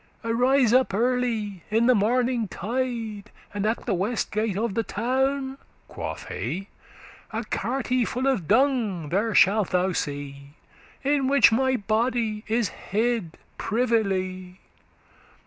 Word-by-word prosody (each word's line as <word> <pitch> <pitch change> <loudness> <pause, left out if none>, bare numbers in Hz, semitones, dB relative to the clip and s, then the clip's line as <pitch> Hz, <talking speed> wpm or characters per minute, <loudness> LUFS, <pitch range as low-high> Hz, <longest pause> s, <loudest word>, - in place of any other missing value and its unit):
Arise 245 +1 +3
up 255 -6 +3
early, 230 -5 0
in 225 +2 +2
the 255 - +6
morning, 240 +2 +1
tide, 225 -1 -3 0.2
And 205 +1 -1
at 225 - -2
the 225 - 0
west 205 +6 -1
gate 215 -2 -1
of 225 -1 -1
the 230 - +1
town,' 265 +5 -1 0.3
quoth - - -6
he, 195 +4 -4 0.6
'A 225 +1 -3
carte 250 +1 0
full 255 +2 -2
of 255 - +1
dung 220 - +2
there 205 +6 0
shalt: 200 0 +4
thou 185 +1 +1
see, 140 -2 -5 0.5
In 280 -1 +2
which 280 -2 +6
my 260 +3 +2
body 220 0 0
is 225 -2 +1
hid 220 -3 -2 0.2
privily. 190 -6 -1
225 Hz, 130 wpm, -25 LUFS, 200-250 Hz, 0.6 s, the